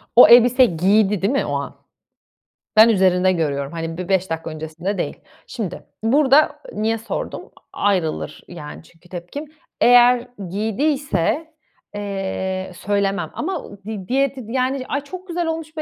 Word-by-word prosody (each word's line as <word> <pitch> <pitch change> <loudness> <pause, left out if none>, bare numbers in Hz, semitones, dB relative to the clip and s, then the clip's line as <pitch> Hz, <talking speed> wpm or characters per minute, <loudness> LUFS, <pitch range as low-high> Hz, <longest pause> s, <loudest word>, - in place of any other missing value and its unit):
O 245 - +10
elbiseyi 245 -5 +6
giydi, 200 +2 +3
değil 205 +8 +1
mi 275 - +1
o - - -3
an? - - -4 1.0
Ben 220 +2 +8
üzerinde 185 -3 +3
görüyorum. 140 -5 -2
Hani, 165 0 -5
bir 180 +1 -6
5 190 -1 +1
dakika 165 0 -4
öncesinde 160 +5 -5
değil. - - -4 0.3
Şimdi, 205 -7 -5 0.2
burada 280 +5 +4
niye 225 +1 0
sordum? 225 - -6 0.2
A - - -9
ayrılır, 185 -6 -1
yani, 155 -3 -9
çünkü 170 +2 -22
tepkim. 180 - -7 0.4
Eğer 245 0 +6 0.2
giydiyse, 275 - -1 0.4
eee, 190 -2 -3
söylemem 200 -4 -1
ama 355 -1 -3
u 205 - -12
di 210 -4 -6
diye 275 +1 +1
tid 245 -5 -10
yani, 260 +1 -1
"Ay, 285 - -2
çok 370 +6 -10
güzel 345 -1 -2
olmuş 320 -1 -5
bu 310 - -1
205 Hz, 150 wpm, -20 LUFS, 180-260 Hz, 1.0 s, O